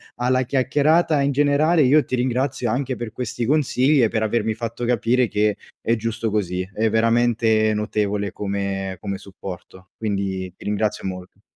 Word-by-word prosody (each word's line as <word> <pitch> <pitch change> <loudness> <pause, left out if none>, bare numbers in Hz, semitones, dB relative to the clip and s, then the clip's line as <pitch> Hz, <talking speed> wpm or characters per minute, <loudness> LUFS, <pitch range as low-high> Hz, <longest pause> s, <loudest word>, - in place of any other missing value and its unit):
alla 130 +1 +1
chiacchierata, 145 +5 +2
in 140 0 +1
generale, 145 +4 +3
io 145 +3 +4
ti 130 - -2
ringrazio 130 0 -1
anche 130 +1 -1
per 120 -3 -6
questi 120 -1 -4
consigli 140 0 +3
e 115 - +5
per 110 0 -1
avermi 110 0 0
fatto 115 +1 -4
capire 120 +1 +2
che 105 -1 +1 0.2
è 115 - +1
giusto 115 0 -2
così. 90 -4 -1
È 110 +1 +1
veramente 110 -1 +2
notevole 105 -1 -1
come 100 -1 -3
come 100 -2 -3
supporto, 95 -1 -10
quindi 95 -4 -3
ti - - -15
ringrazio 105 0 -1
molto. 95 +1 -7
115 Hz, 155 wpm, -22 LUFS, 105-130 Hz, 0.2 s, e